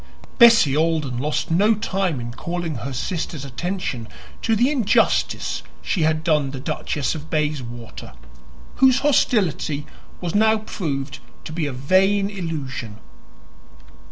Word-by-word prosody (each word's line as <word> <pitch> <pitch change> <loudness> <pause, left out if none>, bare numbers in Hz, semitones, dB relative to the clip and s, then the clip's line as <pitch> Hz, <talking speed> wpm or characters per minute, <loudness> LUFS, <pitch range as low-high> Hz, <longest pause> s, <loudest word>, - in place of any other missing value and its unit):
Bessie 230 - +7
Alden 155 -6 0
lost 150 +4 -1
no 205 +7 +4
time 190 - -1
in 120 0 -5
calling 170 +2 -4
her 125 +5 -5
sister's 155 +2 -3
attention 140 - -4 0.3
to 225 - +2
the 245 +6 +3
injustice 250 -9 +1 0.2
she 180 - -1
had 155 0 +1
done 150 -4 +2
the 135 -1 -6
Duchess 145 -1 -2
of 155 -1 -8
Bayswater, 130 -7 -4 0.6
whose 265 0 +5
hostility 190 - +1 0.3
was 175 -2 -4
now 220 +1 +4
proved 140 - -4 0.2
to 155 - -7
be 160 -2 -1
a - - -3
vain 190 +9 +2
illusion. 145 - -5
160 Hz, 130 wpm, -22 LUFS, 135-195 Hz, 0.6 s, Bessie